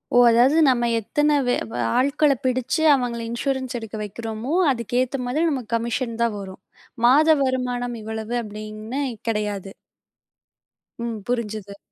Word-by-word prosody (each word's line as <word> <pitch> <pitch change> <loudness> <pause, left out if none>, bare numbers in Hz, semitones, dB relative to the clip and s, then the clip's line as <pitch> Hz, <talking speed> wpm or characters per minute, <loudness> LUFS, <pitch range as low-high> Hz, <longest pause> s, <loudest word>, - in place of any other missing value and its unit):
ஓ! - - +6
அதாவது 250 +6 +4
நம்ம 240 -2 +3
எத்தன 295 +7 0 0.2
வே 245 - +3 0.2
வ - - -9 0.2
ஆள்களப் 280 0 +2
பிடிச்சு, 255 +4 0
அவங்கள 245 -3 -1
இன்சூரன்ஸ் 260 +1 -2
எடுக்க 225 -1 -8
வைக்கிறமோ, 225 +6 -5 0.2
அதுக்கு 235 -2 -4
ஏத்த 255 +2 -2
மாதிரி 285 +7 0
நம்ம 265 -4 -2
கமிஷன் 230 0 -1
தான் 230 -3 +1
வரும். 190 -1 -9 0.4
மாத 290 +6 +6
வருமானம் 250 -2 -1
இவ்வளவு 220 +1 -5
அப்படின்னு 215 +4 -6 0.3
கெடையாது. 205 -3 -2 1.3
ம், 230 -2 -3
புரிஞ்சுது. 215 -4 -3
240 Hz, 130 wpm, -23 LUFS, 220-260 Hz, 1.3 s, ஓ